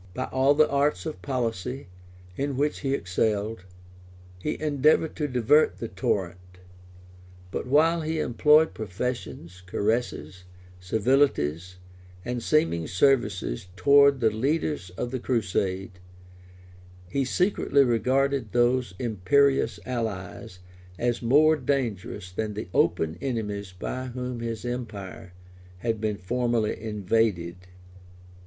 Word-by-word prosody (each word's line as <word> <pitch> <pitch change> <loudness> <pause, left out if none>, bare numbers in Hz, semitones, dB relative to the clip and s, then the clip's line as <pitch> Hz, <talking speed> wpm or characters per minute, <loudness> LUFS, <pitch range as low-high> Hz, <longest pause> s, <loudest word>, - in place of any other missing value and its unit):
By - - -2
all 135 +2 +3
the 155 +1 +5
arts 140 +2 0
of 155 - -5
policy, 125 -1 -3 0.5
in 140 -1 -2
which 145 +2 0
he 135 -1 0
excelled, 105 -1 -1 0.7
he 150 - -3
endeavored 155 +1 +2
to 150 - -1
divert 130 +4 +3
the 115 - -5
torrent; 95 -1 -2 1.1
but - - -4
while 160 +5 +3
he 160 0 -2
employed 150 +5 +4
professions, 100 -4 -5
caresses, 95 -5 -2 0.3
civilities, 90 - +1 0.5
and 120 0 -3
seeming 155 - +1
services 100 - +1
towards 140 +3 +5
the 110 -2 +3
leaders 140 - -1
of 120 - -3
the 130 - -2
crusade, 95 -6 -2 1.1
he 135 +9 -1
secretly 145 -1 +2
regarded 130 0 +1
those 120 -3 +2
imperious 125 +4 +2
allies 95 -8 -5 0.4
as 120 +2 -1
more 150 +6 +5
dangerous 115 -9 -3
than 105 +3 -3
the 105 -3 -6
open 80 +1 +1
enemies 105 -7 -3
by 130 +8 -5
whom 125 -1 -5
his 115 0 -4
empire 105 -7 -6 0.4
had 115 +2 -2
been 105 -2 -1
formerly 120 +2 0
invaded. 105 -4 0
120 Hz, 110 wpm, -26 LUFS, 100-140 Hz, 1.1 s, the